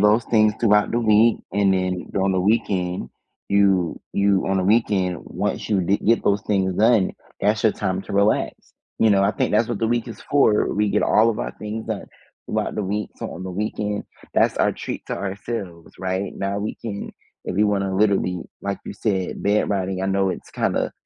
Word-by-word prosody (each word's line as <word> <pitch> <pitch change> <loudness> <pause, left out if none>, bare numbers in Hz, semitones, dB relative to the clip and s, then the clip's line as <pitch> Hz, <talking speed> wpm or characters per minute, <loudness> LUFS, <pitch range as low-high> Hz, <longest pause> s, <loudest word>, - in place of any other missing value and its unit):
those 105 +3 +4
things 110 -2 +3
throughout 105 -2 +4
the 120 - +1
week, 110 +1 +4 0.2
and 100 -1 +3
then 95 -1 -1
during 95 0 +1
the 95 - +1
weekend, 90 - 0 0.4
you 95 -4 +2
you 100 -1 +2
on 95 0 +1
the 95 - 0
weekend, 100 -4 +2
once - - -3
you 105 -3 +2
d 95 +3 +2
get 115 +2 +2
those 100 0 +1
things 95 -2 0
done, 110 -1 +4 0.3
that's 105 +2 +1
your 110 - +4
time 95 +1 -2
to 105 - -9
relax. 100 +2 +2 0.5
You 110 - +4
know, 100 -1 +4
I 100 - +3
think 105 - -1
that's 110 +2 +3
what 120 -4 -2
the 115 - +1
week 120 0 0
is 115 - -9
for. 125 -7 +3
We 105 0 +1
get 105 - +2
all 110 +2 +4
of 110 - -4
our - - -3
things 110 +1 -5
done 110 -3 -3 0.4
throughout - - -2
the 105 - -2
week, 105 +2 -2
so - - -5
on 90 - -7
the 95 - -5
weekend 105 +1 -3 0.3
that's - - +3
our - - +3
treat - - -6
to - - -3
ourselves, 100 -3 -5
right? 95 +1 -2
Now 100 +1 -2
we 105 +1 -3
can 105 -3 -6 0.4
if - - -3
we 100 - +3
wanna 100 -2 0
literally, 95 -3 +1 0.2
like, 100 0 -2
you - - -5
said, 100 -3 -2
bed 105 +1 +2
riding. 95 -1 -1
I 95 - 0
know 95 0 +1
it's - - -7
kinda - - -1
100 Hz, 210 wpm, -22 LUFS, 95-105 Hz, 0.5 s, those